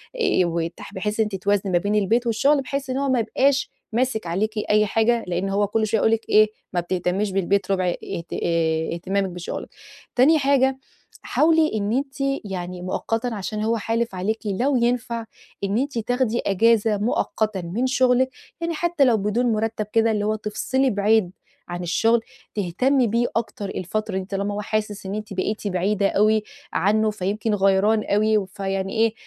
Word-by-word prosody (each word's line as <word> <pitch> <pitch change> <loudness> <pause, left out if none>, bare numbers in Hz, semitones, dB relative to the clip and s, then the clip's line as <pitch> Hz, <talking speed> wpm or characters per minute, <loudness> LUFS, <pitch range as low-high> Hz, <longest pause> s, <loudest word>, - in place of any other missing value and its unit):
آآ 450 - +2
وتح 170 +3 -4
بحيث 210 +3 -3
إن - - +5
أنتِ - - -3
توازني 200 -1 +1
ما 175 - +4
بين 205 +4 0
البيت، 225 +4 +2
والشغل، 275 +6 +3
بحيث 275 +1 -4
إن 255 - -1
هو 280 0 0
ما 255 -2 +2
يبقاش 275 +5 +1 0.2
ماسك 235 -4 0
عليكِ 215 +6 -1
أي 210 0 +4
حاجة، 225 +2 +2
لإن 180 +2 -1
هو 200 +1 +1
كل 215 +1 0
شوية 220 +1 +1
هيقول 220 - +3
لِك 225 0 -1
إيه، 215 0 +6 0.3
ما 180 - +1
بتهتميش 180 +3 -1
بالبيت 195 +1 0
ربع 185 -1 +1
اهت 175 -1 -5
آآ 160 -1 0
اهتمامِك 190 +3 -1
بشُغلِك. 175 -1 -6 0.5
تاني 300 +6 +5
حاجة، 270 -1 +3 0.4
حاولي 320 0 +3
إن 205 0 -1
أنتِ 270 +1 -2 0.3
يعني 180 -2 -5
مؤقتًا 225 +6 -2
عشان 210 +1 -3
هو 230 +1 +1
حالف 225 -1 -1
عليكِ 210 +5 -1
لو 240 +8 +1
ينفع 235 -1 0 0.4
إن 200 +2 0
أنتِ 275 0 -1
تاخدي 240 +1 0
أجازة 220 +1 +3
مؤقتًا 215 -1 -1
من 195 +10 -1
شُغلِك، 255 0 +3 0.3
يعني 335 0 -1
حتّى 340 -1 +1
لو 240 -3 +4
بدون 210 +4 0
مُرتّب 220 0 -1
كده، 225 0 +3
اللي 210 -1 0
هو 215 +1 +1
تفصلي 215 +5 0
بعيد 205 -3 +2 0.4
عن 175 0 -5
الشغل، 225 +7 +2 0.3
تهتمي 240 +7 +1
بيه 235 +3 +1
أكتر 210 -3 -3
الفترة 200 +3 -3
دي 190 - -3
طالما 200 +1 -2
هو 205 - -3
حاسس 210 -1 -3
إن 195 +2 -3
أنتِ 215 -1 -6
بقيتِ 205 +3 -2
بعيدة 200 +2 +1
أوي 215 +1 +3 0.3
عنّه، 215 +4 +2
فيمكن 210 +2 -2
غيران 200 +2 +3
أوي، 215 +1 +2
و 205 - -1
فيعني 195 0 -3
إيه، 225 -1 +2
215 Hz, 175 wpm, -23 LUFS, 195-235 Hz, 0.5 s, إيه